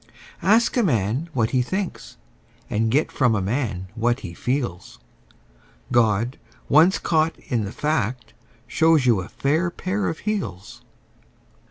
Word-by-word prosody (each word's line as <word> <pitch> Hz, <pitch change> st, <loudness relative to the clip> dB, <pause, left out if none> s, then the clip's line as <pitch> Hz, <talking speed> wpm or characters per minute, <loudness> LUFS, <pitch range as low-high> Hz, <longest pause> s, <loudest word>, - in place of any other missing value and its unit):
Ask 225 Hz, +6 st, +3 dB
a -, -, +4 dB
man 125 Hz, -, 0 dB
what 115 Hz, -5 st, 0 dB
he 130 Hz, -, +2 dB
thinks, 175 Hz, -, -4 dB, 0.5 s
and 110 Hz, +1 st, +1 dB
get 140 Hz, +7 st, +1 dB
from 125 Hz, -5 st, +2 dB
a -, -, +1 dB
man 100 Hz, -2 st, -2 dB
what 120 Hz, +2 st, 0 dB
he 85 Hz, -4 st, -7 dB
feels: 120 Hz, -4 st, -3 dB, 0.9 s
God, 115 Hz, 0 st, +2 dB, 0.3 s
once 165 Hz, +6 st, +5 dB
caught 160 Hz, -1 st, +1 dB
in 115 Hz, -5 st, -2 dB
the 100 Hz, -, -5 dB
fact, 125 Hz, -6 st, -2 dB, 0.3 s
shows 160 Hz, -4 st, +3 dB
you 115 Hz, -6 st, +3 dB
a 90 Hz, -, -9 dB
fair 160 Hz, +6 st, 0 dB
pair 190 Hz, +3 st, -2 dB
of 160 Hz, -, -4 dB
heels. 105 Hz, -, -4 dB
125 Hz, 140 wpm, -23 LUFS, 110-160 Hz, 0.9 s, once